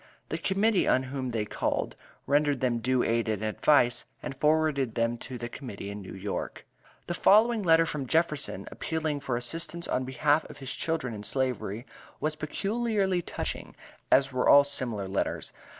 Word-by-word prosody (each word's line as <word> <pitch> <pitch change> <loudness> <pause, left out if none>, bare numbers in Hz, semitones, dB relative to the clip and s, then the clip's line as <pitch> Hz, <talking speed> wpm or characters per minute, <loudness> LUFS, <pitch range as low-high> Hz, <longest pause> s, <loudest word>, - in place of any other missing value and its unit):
The - - -2
Committee 200 +1 +2
on 130 - +3
whom 130 -2 -2
they 115 -3 -1
called, - - -2 0.3
rendered 145 -1 +2
them 120 -2 +1
due 125 +1 +1
aid 115 0 +1
and 110 -1 -1
advice, 120 +3 +3 0.2
and - - -5
forwarded 150 -4 +1
them 115 0 +1
to 130 - -7
the 120 0 -5
Committee 110 -6 -7
in 100 0 -7
New 95 - -9
York. 100 +1 -5 0.4
The 175 - -3
following 220 +5 +5
letter 165 -3 +5
from 150 -4 -4
Jefferson, 160 0 0
appealing 155 -2 -2
for 130 -4 -2
assistance 165 +7 -1
on 130 - 0
behalf 145 +4 +2
of - - -10
his 135 -2 -5
children 160 -7 -2
in 105 - -6
Slavery, 125 -1 -2 0.3
was 155 0 -1
peculiarly 195 +4 0
touching, - - -5 0.4
as 135 0 +5
were 125 - +2
all 140 - +9
similar 125 -8 -2
letters. 95 +1 -2
135 Hz, 165 wpm, -28 LUFS, 120-160 Hz, 0.4 s, all